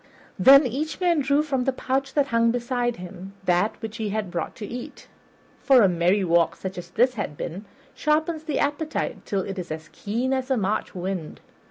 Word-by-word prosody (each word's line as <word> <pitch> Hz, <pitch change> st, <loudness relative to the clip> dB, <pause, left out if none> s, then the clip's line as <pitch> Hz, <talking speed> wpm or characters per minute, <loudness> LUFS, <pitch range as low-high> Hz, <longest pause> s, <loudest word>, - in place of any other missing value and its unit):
Then 275 Hz, +2 st, +8 dB
each 280 Hz, +6 st, -3 dB
man 350 Hz, -3 st, +3 dB
drew 285 Hz, +1 st, +2 dB
from 270 Hz, -4 st, -1 dB
the 265 Hz, -, +2 dB
pouch 265 Hz, +1 st, -2 dB
that 285 Hz, -2 st, +2 dB
hung 230 Hz, 0 st, +3 dB
beside 240 Hz, 0 st, -1 dB
him 180 Hz, +2 st, -9 dB
that 180 Hz, +4 st, +1 dB
which 220 Hz, 0 st, -5 dB
he 220 Hz, -2 st, -2 dB
had 205 Hz, -3 st, -3 dB
brought 170 Hz, -2 st, -3 dB
to 215 Hz, -, -6 dB
eat, 240 Hz, +4 st, -8 dB, 0.5 s
for 260 Hz, -4 st, +5 dB
a -, -, +6 dB
merry 180 Hz, +3 st, +2 dB
walk 170 Hz, -1 st, +3 dB
such 190 Hz, -1 st, -6 dB
as 175 Hz, 0 st, -9 dB
this 245 Hz, +7 st, +2 dB
had 205 Hz, -10 st, -4 dB
been 185 Hz, +6 st, -5 dB, 0.3 s
sharpens 310 Hz, +1 st, 0 dB
the 305 Hz, -3 st, -1 dB
appetite 295 Hz, +2 st, -2 dB
till 195 Hz, -2 st, 0 dB
it 195 Hz, +1 st, -5 dB
is 180 Hz, -, -6 dB
as 155 Hz, 0 st, -6 dB
keen 240 Hz, +6 st, -2 dB
as 260 Hz, 0 st, -2 dB
a 265 Hz, -, +2 dB
March 205 Hz, -1 st, -1 dB
wind. 180 Hz, -3 st, -4 dB
230 Hz, 200 wpm, -24 LUFS, 185-270 Hz, 0.5 s, Then